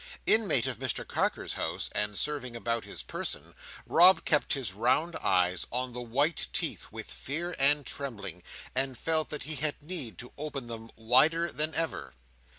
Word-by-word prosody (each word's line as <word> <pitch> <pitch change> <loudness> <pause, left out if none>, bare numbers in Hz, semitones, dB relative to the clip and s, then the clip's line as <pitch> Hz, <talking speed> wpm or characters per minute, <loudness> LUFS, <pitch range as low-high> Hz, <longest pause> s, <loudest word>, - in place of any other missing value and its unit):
Inmate 185 - +3
of 130 -2 -1
Mr 130 -3 -2
Carker's - - -1
house, - - -2
and 105 0 0
serving 140 -5 -2
about 115 -1 -2
his - - -7
person, - - -5 0.3
Rob 180 +3 +6
kept 150 -1 +3
his 130 -10 -2
round 125 - +2
eyes 90 0 +1
on 125 0 -1
the 125 - -5
white 140 +7 0
teeth - - -2
with - - -7
fear 170 +6 -3
and 145 +1 +5
trembling, 100 - -6 0.3
and 130 -1 +1
felt 160 -1 +1
that 150 - -3
he 155 +1 -3
had 150 +2 -1
need 145 - -3
to 125 - -9
open 145 -4 -4
them 115 -1 -8
wider 155 +9 +4
than 155 +4 +1
ever. 70 - -2
135 Hz, 165 wpm, -29 LUFS, 115-155 Hz, 0.3 s, Rob